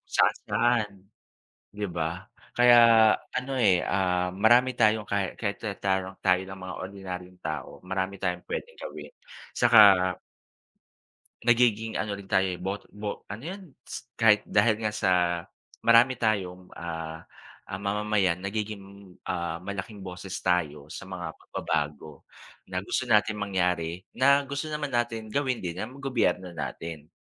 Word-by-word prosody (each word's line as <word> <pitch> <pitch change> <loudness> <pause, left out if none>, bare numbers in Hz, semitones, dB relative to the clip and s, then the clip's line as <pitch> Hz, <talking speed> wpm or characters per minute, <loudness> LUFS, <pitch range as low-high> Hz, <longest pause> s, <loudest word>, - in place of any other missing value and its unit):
saan-saan, 120 -3 +2 0.9
'di 105 0 -3
ba? 85 +6 -4 0.2
Kaya 120 0 +7 0.6
ano 130 +2 -2
eh, 95 -7 +4
ah, 90 -2 +1
marami 120 +5 +4
tayong 110 -1 +3
kay 100 -2 -1
kay 100 -3 -1
ta 105 -3 -4
tayo 95 -1 -1
tayo 90 -1 +3
na 95 0 -8
mga 95 0 -7
ordinaryong 90 -1 -7
tao, 80 -4 -5
marami 95 +1 -2
tayong 90 -2 -2
pwedeng 480 +1 -5
gawin, - - -8 0.4
'tsaka 120 -2 +5 1.6
nagiging 115 -2 +2
ano 105 -1 -2
rin 100 -1 -9
tayo, 95 0 +3 0.2
bot 100 +2 -4
bo 105 0 -6
ano 105 - -7
yun? 190 +5 -6 0.2
Ts 120 0 -8
kahit 105 -2 +5
dahil 105 +1 +3
nga 105 - 0
sa 95 -3 +1 0.7
marami 115 +3 +6
tayong, 95 -6 -1
ah, 80 -1 -6 0.4
ah, 95 - -6
mamamayan 100 -3 +1
nagiging, 100 -1 -6
ah, 85 -2 -2
malaking 100 +2 -6
boses 90 +1 -7
tayo 75 -5 0
sa - - -7
mga 85 -3 -5
pagbabago 75 0 -4 0.5
na 95 - -2
gusto - - -1
natin 105 0 +4
mangyari, 90 -3 -1
na 140 +2 +4
gusto 145 +3 -4
naman 150 -2 -3
natin 115 -2 -1
gawin 130 -2 0
din 90 0 -4
ng 125 +5 -7
gobyerno 115 -9 0
natin. 80 -1 -6
100 Hz, 135 wpm, -27 LUFS, 90-115 Hz, 1.6 s, Kaya